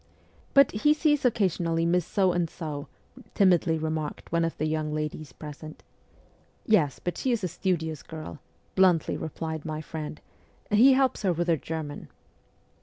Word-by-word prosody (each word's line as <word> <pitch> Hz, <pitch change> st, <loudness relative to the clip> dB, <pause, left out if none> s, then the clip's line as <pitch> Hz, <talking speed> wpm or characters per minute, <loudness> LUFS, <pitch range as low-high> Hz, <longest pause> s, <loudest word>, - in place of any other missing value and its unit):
' -, -, -32 dB
But 275 Hz, -2 st, +7 dB
he 295 Hz, +9 st, +3 dB
sees 295 Hz, -2 st, +2 dB
occasionally 175 Hz, -8 st, +1 dB
Miss 175 Hz, 0 st, +1 dB
So 190 Hz, -3 st, +2 dB
and 175 Hz, -2 st, 0 dB
So,' 150 Hz, -4 st, -6 dB, 0.5 s
timidly 175 Hz, -4 st, +4 dB
remarked 155 Hz, -1 st, -4 dB
one 170 Hz, 0 st, +2 dB
of 165 Hz, -, -2 dB
the 155 Hz, -, -1 dB
young 155 Hz, -1 st, -1 dB
ladies 150 Hz, -1 st, -4 dB
present. 155 Hz, +1 st, -10 dB, 0.8 s
'Yes, 160 Hz, -11 st, +3 dB
but 175 Hz, -, -4 dB
she 260 Hz, -, 0 dB
is 230 Hz, -4 st, 0 dB
a -, -, +1 dB
studious 165 Hz, -4 st, -2 dB
girl,' 155 Hz, -1 st, -8 dB, 0.3 s
bluntly 185 Hz, -4 st, +3 dB
replied 160 Hz, 0 st, -5 dB
my 155 Hz, -1 st, -4 dB
friend, 155 Hz, -1 st, -6 dB, 0.5 s
'he 240 Hz, +6 st, +7 dB
helps 265 Hz, 0 st, +2 dB
her 190 Hz, -4 st, +2 dB
with 175 Hz, +1 st, -1 dB
her 165 Hz, -, +5 dB
German.' 155 Hz, -1 st, -6 dB
165 Hz, 160 wpm, -27 LUFS, 155-190 Hz, 0.8 s, But